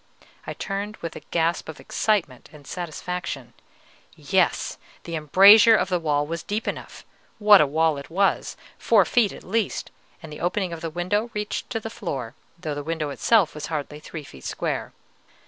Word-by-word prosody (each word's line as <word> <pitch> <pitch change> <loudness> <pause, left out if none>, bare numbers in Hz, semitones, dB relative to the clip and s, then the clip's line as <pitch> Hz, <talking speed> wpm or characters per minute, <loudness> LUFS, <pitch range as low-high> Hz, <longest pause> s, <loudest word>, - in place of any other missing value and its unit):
I - - -3
turned 205 +2 -4
with 165 -1 -6
a - - -6
gasp 170 -1 0
of 160 - -8
excitement 175 - -1
and 150 -2 -15
satisfaction: 170 -7 -5 0.6
yes, - - 0 0.2
the 170 - -5
embrasure 200 +9 +7
of 195 - +1
the 180 -2 +1
wall 145 -3 0
was 165 +2 -4
deep 210 +2 -3
enough; - - -6 0.3
what 210 -2 +7
a 150 - +3
wall 155 0 +1
it 140 - -11
was! 195 +4 0 0.2
four 210 -5 +4
feet 225 0 +2
at - - -11
least, 215 0 -2 0.3
and 155 -2 -9
the - - -9
opening 180 +1 -1
of 165 - -7
the 165 - -3
window 185 +7 -1
reached 210 0 -3
to 225 - -2
the 225 0 -7
floor, 135 - -5 0.2
though 160 -3 -4
the 145 - -4
window 155 -1 -3
itself 190 - +3
was 150 0 -6
hardly 150 -1 -4
three 155 0 -8
feet 65 - -13
square. - - -3
170 Hz, 180 wpm, -24 LUFS, 150-205 Hz, 0.6 s, embrasure